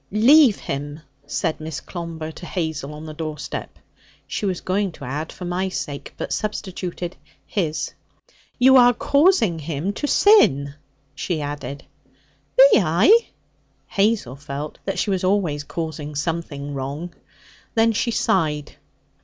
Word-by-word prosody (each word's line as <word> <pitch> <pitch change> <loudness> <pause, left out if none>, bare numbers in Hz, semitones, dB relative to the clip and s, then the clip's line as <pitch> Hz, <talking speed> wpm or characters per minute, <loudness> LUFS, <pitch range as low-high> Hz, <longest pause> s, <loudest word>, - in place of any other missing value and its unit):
'Leave 245 +3 +6
him!' 145 +2 -4 0.3
said 155 +2 -2
Miss 155 -1 -5
Clomber 165 -3 -6
to 175 - -10
Hazel 160 -5 -3
on 155 +1 -9
the 155 - -7
doorstep. 150 -2 -6 0.5
She 210 - -3
was 185 -2 -1
going 195 +1 0
to 140 - -9
add 150 +5 -4
'for 180 - -8
my 180 +2 -1
sake,' 145 -6 -5
but - - -3
substituted 185 -4 -4 0.3
'his.' 165 -7 -2 0.6
'You 265 +1 +7
are 245 -1 +6
causing 280 - +3
him 160 +5 -3
to 290 - -3
sin,' 140 - +5 0.4
she 165 +2 -2
added. 145 -1 -5 0.7
'Be 270 -1 +8
I?' 210 - +4 0.6
Hazel 200 - +1
felt 145 +1 -6
that 195 - -2
she 205 - 0
was 190 -1 -1
always 185 -7 +1
causing 150 -1 -5
something 145 -2 -3
wrong. 140 +6 -5 0.6
Then 225 0 +4
she 230 +2 0
sighed. 150 -10 0
170 Hz, 135 wpm, -22 LUFS, 150-205 Hz, 0.7 s, Be